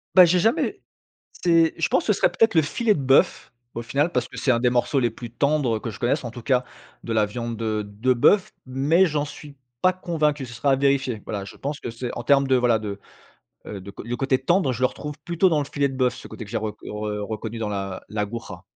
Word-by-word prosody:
Bah, 185 - +10
j'ai 175 +1 +3
jamais 225 +6 +1 0.5
c'est 165 -2 +3
je - - +1
pense - - +2
que - - +3
ce - - -5
serait - - +4
peut-être 225 -2 +3
le 160 - +6
filet 215 +9 +1
de - - -3
bœuf 135 0 +2 0.2
au 115 - -4
final, 145 +8 0
parce - - -1
que - - -14
c'est 130 - +2
un 115 - +2
des 125 - +3
morceaux 125 +3 +1
les 120 -2 +2
plus 115 +1 -9
tendres 140 -4 +1
que 115 - -5
je - - -11
connaisse, 130 +3 0
en 120 - -5
tout 120 - -9
cas, 125 0 +1 0.4
de 115 - -3
la 110 -1 +3
viande 115 +2 -5
de 110 -1 -1
de 110 +6 +1
bœuf, 190 - +3
mais 140 +8 +3
j'en 150 -4 0
suis 145 -1 -11 0.3
pas 185 0 +4
convaincu, 150 -6 -1
ce 120 - -10
sera 135 +4 +1
à - - +5
vérifier. 135 -4 +1
Voilà, 100 -2 -4
je - - -11
pense 145 +1 -4
que - - -5
c'est 120 +1 -5
en 120 - -4
termes 140 0 +4
de, 130 - +4
voilà, 120 -3 +3
de, 100 -2 -5 0.7
heu, 100 - -6
de 100 +2 -9
c - - -20
le 120 - -2
côté 130 +1 +1
tendre, 155 +1 +2
je 120 - -6
le 130 - +5
retrouve 150 +3 -7
plutôt 175 +2 +2
dans 160 - +2
le 145 - -3
filet 140 0 0
de 135 - -7
bœuf, 125 -2 +1
ce - - -11
côté 115 - -8
que 100 - -13
j'ai 115 - -2
rec 110 -1 -4
re 105 -1 -4
reconnu 110 +1 -5
dans 110 -2 -2
l'A 95 -2 -4
l'Aguja. 105 -3 -5
130 Hz, 260 wpm, -24 LUFS, 115-145 Hz, 0.7 s, Bah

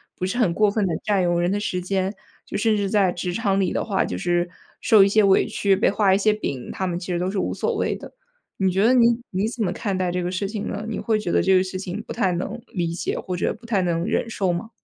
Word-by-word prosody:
不 185 - -3
是 195 +6 -2
很 210 -9 +2
过 210 +3 +3
分 205 -1 0
地 175 - -1
占 200 -3 +2
用 175 0 +1
人 175 +1 +1
的 205 - 0
时 180 -3 -2
间， 190 +1 -1 0.3
就 - - -4
甚 220 +1 +2
至 200 -1 -1
在 195 -3 +2
职 175 0 -3
场 195 -2 0
里 185 - 0
的 - - -1
话， 195 -4 0
就 90 - -4
是 175 - 0 0.3
受 215 -2 +6
一 - - +3
些 215 +1 +3
委 195 -1 +4
屈， 200 -2 +1
被 195 - +2
画 200 -3 +3
一 - - +4
些 210 +1 +3
饼， 140 - -4
他 190 - -3
们 175 -1 -2
其 180 - -8
实 175 - -1
都 180 - -1
是 205 - -4
无 - - -1
所 - - -1
谓 - - 0
的。 - - -11 0.4
你 190 -1 +2
觉 195 +4 +2
得 250 - +5
你 235 -1 +4
你 195 +3 0
怎 240 -1 -6
么 180 - -1
看 195 -1 -2
待 185 -1 0
这 180 0 -2
个 180 - -2
事 195 +2 -2
情 210 0 -4
呢？ 205 +1 -4
你 220 - -3
会 220 -2 0
觉 200 - -4
得 - - +4
这 190 - +3
个 - - +4
事 185 0 -5
情 185 +2 -5
不 - - -5
太 195 -5 +1
能 200 +7 -3
理 170 -3 -2
解， 175 - -3
或 180 -2 -4
者 175 - 0
不 235 - -16
太 210 -5 +1
能 170 -1 0
忍 230 - -1
受 190 -5 0
吗？ 195 +6 -4
195 Hz, 315 characters per minute, -23 LUFS, 180-210 Hz, 0.4 s, 受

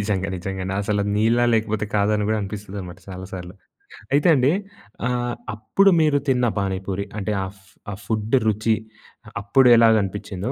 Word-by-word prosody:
నిజంగ, 100 -2 -1
నిజంగండి. 95 +1 -4
అసలు 100 0 0
నీళ్ళా 115 +3 +3
లేకపోతే 110 -1 0
కాదని 105 0 +2
గూడా 110 - +1
అనిపిస్తదనమాట 100 -2 -7
చాలా 95 0 -7
సార్లు. 90 0 -8 0.6
అయితే 145 +4 +3
అండి, 130 +1 +3 0.6
ఆహ్, 120 -1 -1 0.2
అప్పుడు 195 - +3
మీరు 150 -2 +3
తిన్న 125 -2 +2
పానీపూరి, 95 0 -3
అంటే 105 +1 -2
ఆ - - -3
ఫ్ 95 - -24 0.2
ఆ - - -4
ఫుడ్డు 110 +4 +1
రుచి, 110 +1 +2 0.5
అ - - -9
అప్పుడు 125 +6 +4
ఎలాగనిపిచ్చిందో, 105 -3 +1
105 Hz, 150 wpm, -22 LUFS, 95-115 Hz, 0.6 s, అప్పుడు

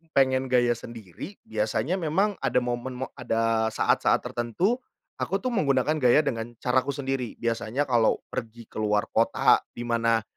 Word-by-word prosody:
pengen 130 -1 +3
gaya 125 -1 +3
sendiri 115 - -9
biasanya 110 +10 -1
memang 185 +6 +1
ada - - 0
momen 125 +1 -3
mo - - -11
ada 115 -2 +1
saat-saat - - +2
tertentu, 170 - -1 0.4
aku 195 - 0
tuh 255 - 0
menggunakan 145 - +2
gaya 125 +3 +5
dengan 120 -4 -3
caraku 130 +2 +1
sendiri, 135 -4 -3
biasanya 115 +3 -1
kalau 120 -3 +3
pergi 115 +1 -6
ke - - -7
luar 105 -1 +1
kota - - +4 0.2
di 120 - -5
mana 115 -1 +1
120 Hz, 150 wpm, -26 LUFS, 115-135 Hz, 0.4 s, gaya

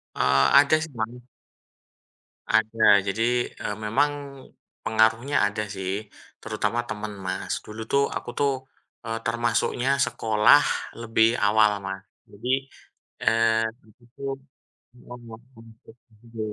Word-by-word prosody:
Eee, 65 +1 +3
ada 145 +2 +4
sih, 160 -2 -6
Mas. 120 +3 -5 1.2
Ada. 110 -2 +4
Jadi, 120 +4 0
eee, 105 - -5
memang 110 +7 +1 0.7
pengaruhnya 115 +5 +2
ada 105 +1 -2
sih. 100 +1 -4 0.3
Terutama 120 +3 -2
teman, 105 -1 -6
Mas. 95 -1 -3
Dulu 110 +1 -8
tuh 140 0 +3
aku - - -6
tuh, 140 -1 +2 0.5
eee, 115 0 -3
termasuknya 120 +3 0
sekolah 110 +2 +4 0.4
lebih 115 0 +3
awal, 105 0 +3
Mas. 95 0 -5 0.3
Jadi, 130 +6 -2 0.5
eee 115 0 +2 0.2
di 110 - -21
situ, 120 +3 -16 0.7
mhm, 125 0 -12 0.4
masuk 115 +1 -17 0.2
sendiri 115 -2 -6
110 Hz, 115 wpm, -25 LUFS, 105-120 Hz, 1.2 s, ada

